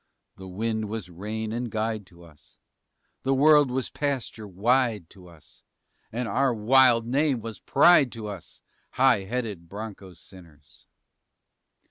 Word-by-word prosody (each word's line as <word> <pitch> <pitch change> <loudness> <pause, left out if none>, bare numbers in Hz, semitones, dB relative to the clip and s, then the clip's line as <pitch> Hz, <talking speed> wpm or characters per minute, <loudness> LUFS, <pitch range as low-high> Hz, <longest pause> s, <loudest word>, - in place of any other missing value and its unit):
The 95 - -10
wind 110 +3 -3
was 105 -5 -6
rein 105 +5 -5
and 120 +1 -3
guide 110 -2 -3
to 85 -2 -18
us; 75 -3 -20 0.6
The 135 +1 0
world 145 0 +5
was 130 0 -3
pasture 130 -6 -4
wide 110 -1 0
to 95 -3 -16
us 80 -4 -19 0.5
And 120 +1 -3
our 130 -1 +1
wild 120 +1 +4
name 135 +1 +1
was 110 -2 -8
pride 145 -3 +4
to 115 -2 -8
us 100 -5 -10 0.3
High 125 -7 +3
headed 105 -7 -5
bronco 100 -2 -9
sinners! 80 -5 -17
110 Hz, 135 wpm, -25 LUFS, 95-125 Hz, 0.6 s, world